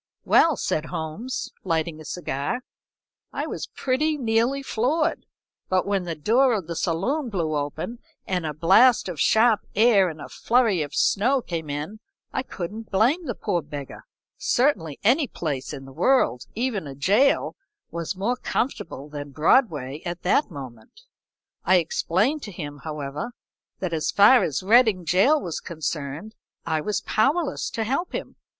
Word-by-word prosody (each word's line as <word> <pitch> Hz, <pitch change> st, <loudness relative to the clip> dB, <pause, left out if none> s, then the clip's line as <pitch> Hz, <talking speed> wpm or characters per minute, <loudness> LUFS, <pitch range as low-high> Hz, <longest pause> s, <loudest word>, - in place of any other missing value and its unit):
"Well," 320 Hz, -6 st, +4 dB
said 155 Hz, -, -1 dB
Holmes, 160 Hz, +14 st, -4 dB
lighting 165 Hz, -3 st, -1 dB
a -, -, -11 dB
cigar, 155 Hz, -, -3 dB, 0.7 s
"I -, -, -3 dB
was -, -, -5 dB
pretty 300 Hz, +4 st, 0 dB
nearly 240 Hz, +2 st, +1 dB
floored, 290 Hz, +7 st, 0 dB, 0.4 s
but 185 Hz, -1 st, +2 dB
when 195 Hz, -2 st, 0 dB
the 170 Hz, -2 st, -3 dB
door 235 Hz, -, +3 dB
of 195 Hz, -5 st, -3 dB
the 170 Hz, +1 st, -5 dB
saloon 235 Hz, -, -1 dB
blew 165 Hz, -7 st, -1 dB
open 155 Hz, -, -4 dB, 0.3 s
and 180 Hz, -2 st, -1 dB
a 155 Hz, -, -2 dB
blast 195 Hz, -, +5 dB
of 175 Hz, -5 st, -5 dB
sharp 220 Hz, -, +4 dB, 0.2 s
air 210 Hz, -4 st, +5 dB
and 160 Hz, -1 st, -9 dB
a -, -, -7 dB
furry 230 Hz, -7 st, +2 dB
of 145 Hz, -1 st, -5 dB
snow 250 Hz, +7 st, +3 dB
came 165 Hz, -9 st, -5 dB
in, 150 Hz, +9 st, -5 dB, 0.3 s
I -, -, 0 dB
couldn't 215 Hz, -1 st, -7 dB
blame 260 Hz, -, +2 dB
the 240 Hz, -, -2 dB
poor 175 Hz, 0 st, -1 dB
beggar 145 Hz, -2 st, -8 dB, 0.3 s
certainly 200 Hz, -, +1 dB
any 265 Hz, +7 st, +3 dB
place 145 Hz, -, -4 dB
in 135 Hz, -3 st, -8 dB
the 135 Hz, -, -12 dB
world, 155 Hz, -, +2 dB
even 225 Hz, -, -2 dB
a 135 Hz, -, -8 dB
jail, 205 Hz, -, +2 dB, 0.4 s
was 170 Hz, +2 st, -4 dB
more 220 Hz, +7 st, -1 dB
comfortable 165 Hz, -, -3 dB
than 145 Hz, -1 st, -7 dB
Broadway 150 Hz, -, +2 dB
at 175 Hz, -1 st, -5 dB
that 220 Hz, +10 st, +2 dB
moment. 135 Hz, -, -11 dB, 0.6 s
I 190 Hz, -, +4 dB
explained 185 Hz, -, +1 dB
to 210 Hz, -, -7 dB
him, 145 Hz, -5 st, -7 dB
however, 150 Hz, -, -5 dB, 0.4 s
that 180 Hz, -3 st, -3 dB
as 155 Hz, -1 st, -1 dB
far 215 Hz, +5 st, +6 dB
as 155 Hz, +3 st, -1 dB
Reading 220 Hz, -3 st, +4 dB
gaol 205 Hz, -, +3 dB
was 170 Hz, -4 st, -3 dB
concerned, 160 Hz, +3 st, -5 dB, 0.3 s
I 160 Hz, -2 st, 0 dB
was 210 Hz, +4 st, -1 dB
powerless 285 Hz, +7 st, 0 dB
to 225 Hz, -, -2 dB
help 275 Hz, +10 st, -2 dB
him. -, -, -5 dB
185 Hz, 155 wpm, -24 LUFS, 155-245 Hz, 0.7 s, far